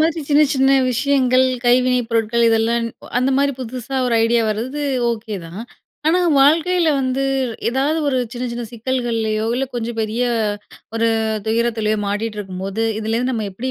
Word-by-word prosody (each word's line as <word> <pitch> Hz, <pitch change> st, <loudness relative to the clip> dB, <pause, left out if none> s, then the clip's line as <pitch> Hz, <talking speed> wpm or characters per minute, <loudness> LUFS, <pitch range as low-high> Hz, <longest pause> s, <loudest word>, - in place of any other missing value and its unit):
மாதிரி 320 Hz, 0 st, +1 dB
சின்ன 295 Hz, +1 st, +5 dB
சின்ன 270 Hz, +1 st, +3 dB, 0.2 s
விஷயங்கள், 260 Hz, 0 st, +2 dB, 0.2 s
கைவினைப் 250 Hz, -1 st, +3 dB
பொருட்கள். 230 Hz, +1 st, +1 dB
இதெல்லாம் 225 Hz, +1 st, +2 dB
ன் -, -, -5 dB, 0.3 s
அந்த 260 Hz, +2 st, +1 dB
மாதிரி 280 Hz, 0 st, +2 dB
புதுசா 255 Hz, +2 st, -5 dB
ஒரு 235 Hz, -, +1 dB
ஐடியா 235 Hz, +1 st, +2 dB
வரது 255 Hz, +8 st, -3 dB, 0.3 s
ஓகே 220 Hz, -2 st, -4 dB
தான். 180 Hz, +6 st, -8 dB, 0.5 s
ஆனா 355 Hz, +3 st, +3 dB, 0.2 s
வாழ்க்கையில 330 Hz, +4 st, +3 dB
வந்து 260 Hz, +1 st, -1 dB, 0.5 s
ஏதாவது 275 Hz, +6 st, 0 dB
ஒரு 260 Hz, -2 st, +1 dB
சின்ன 245 Hz, +1 st, -4 dB
சின்ன 240 Hz, 0 st, -4 dB
சிக்கல்கள்லையோ, 230 Hz, -3 st, -1 dB
இல்லை 265 Hz, +2 st, -1 dB
கொஞ்சம் 235 Hz, -1 st, -4 dB
பெரிய 220 Hz, +3 st, -1 dB, 0.7 s
ஒரு 230 Hz, 0 st, +2 dB, 0.4 s
துயரத்திலயோ 220 Hz, -1 st, 0 dB
மாட்டிட்டு 210 Hz, +1 st, -3 dB
இருக்கும்போது, 195 Hz, +2 st, -4 dB, 0.2 s
"இதுலேருந்து 230 Hz, +4 st, -1 dB
நம்ம 220 Hz, -3 st, -2 dB
எப்படி 250 Hz, +7 st, -4 dB
240 Hz, 150 wpm, -19 LUFS, 225-265 Hz, 0.7 s, சின்ன